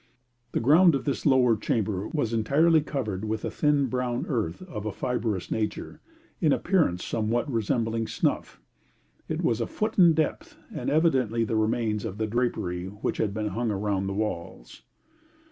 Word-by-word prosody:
The - - +1
ground 155 +7 +5
of 135 - -3
this 140 +1 -1
lower 125 -4 +5
chamber 105 -2 -1
was 120 -8 -2
entirely 150 +9 +3
covered 110 -10 -3
with 110 0 -2
a - - -3
thin 150 -2 +2
brown 125 -1 -2
earth 110 - -2
of 110 - -6
a - - -1
fibrous 110 -4 -2
nature, 110 -1 -3 0.4
in 155 -4 +3
appearance 155 - +1
somewhat 115 +4 -1
resembling 115 -2 -1
snuff; - - -2 0.7
it - - -2
was 115 0 +1
a 115 - -1
foot 215 -1 -2
in 170 -3 +7
depth, 155 -1 -2 0.2
and - - -3
evidently 130 -8 +2
the 110 0 -2
remains 110 -1 0
of 95 - -5
the 110 - 0
drapery 105 -6 -1
which 100 +2 -4
had 105 - 0
been 105 0 -2
hung 115 +2 -2
around 100 -1 -1
the 95 - -3
walls. 85 - -5
115 Hz, 165 wpm, -26 LUFS, 105-140 Hz, 0.7 s, in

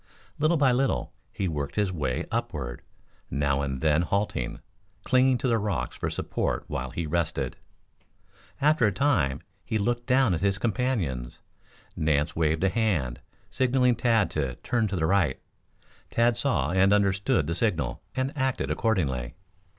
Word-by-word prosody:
Little 155 +3 +3
by 140 -3 +4
little 135 +2 0 0.2
he 95 - -2
worked 75 -4 -3
his 105 -3 +1
way 75 -2 -2
upward, 85 - -3 0.5
Now 70 +1 0
and 65 -2 -3
then 80 +1 +3
halting, 100 +4 -1 0.4
clinging 130 0 +4
to 130 - -1
the 115 -2 +2
rocks 100 - -2
for - - -2
support - - -2
while - - -3
he 85 - -4
rested. 80 +1 -1 1.0
After 150 -5 +4
a - - +2
time 95 - +1 0.2
he 110 - -1
looked 120 +3 -1
down 130 -5 +4
at 80 - -2
his 100 0 +1
companions. 95 - -1 0.6
Nance 75 0 +1
waved 80 +1 +1
a 95 - +4
hand, 90 - 0 0.3
signaling 125 -1 +2
Tad 115 -3 +2
to 70 -5 -2
turn 120 -3 +1
to 100 - -3
the 80 -3 0
right. 90 -6 +2 0.7
Tad 120 0 +2
saw - - 0
and 95 +2 +4
understood 100 -6 +2
the 85 - -2
signal 80 - -1
and 130 +2 -1
acted 130 -2 -1
accordingly. 70 - 0
100 Hz, 150 wpm, -27 LUFS, 75-120 Hz, 1.0 s, by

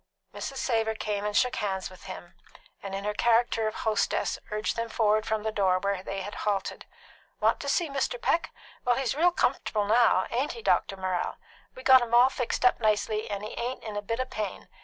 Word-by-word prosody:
Mrs. 270 - -5
Savor 225 -4 0
came 210 -1 -3
and 210 0 0
shook 250 -1 +2
hands 190 -2 -2
with 185 - -13
them, - - -9 0.5
and 195 -1 -5
in 195 - -4
her 210 0 -1
character 230 0 +2
of 215 - -3
hostess 220 -2 0
urged 210 0 -1
them 230 0 -3
forward 215 -1 +2
from 220 -1 -1
the 220 - -1
door, 190 -3 +2
where 200 0 -1
they 195 +1 -5
had 205 - -6
halted. 200 -2 -2 0.5
"Want - - +2
to - - -4
see 345 - +2
Mr. 280 - -2
Peck? 335 -7 +1 0.3
Well, 245 0 +3
he's 265 -3 0
real 340 +5 +3
comf'table 215 -10 0
now; 225 -4 +4
ain't 260 +5 0
he, 460 - -10
Dr. 195 - +1
Morrell? 185 -1 -2 0.4
We 255 - -10
got 260 -1 +8
him 235 0 0
all 245 +2 +7
fixed 250 -1 -2
up 250 - +4
nicely, 215 -1 0
and 200 0 -4
he 215 - -5
ain't 245 +2 -3
in 215 -2 -6
a 205 - -2
bit 230 +3 -3
o' 255 - 0
pain. 215 -6 -5
220 Hz, 215 wpm, -28 LUFS, 205-245 Hz, 0.5 s, got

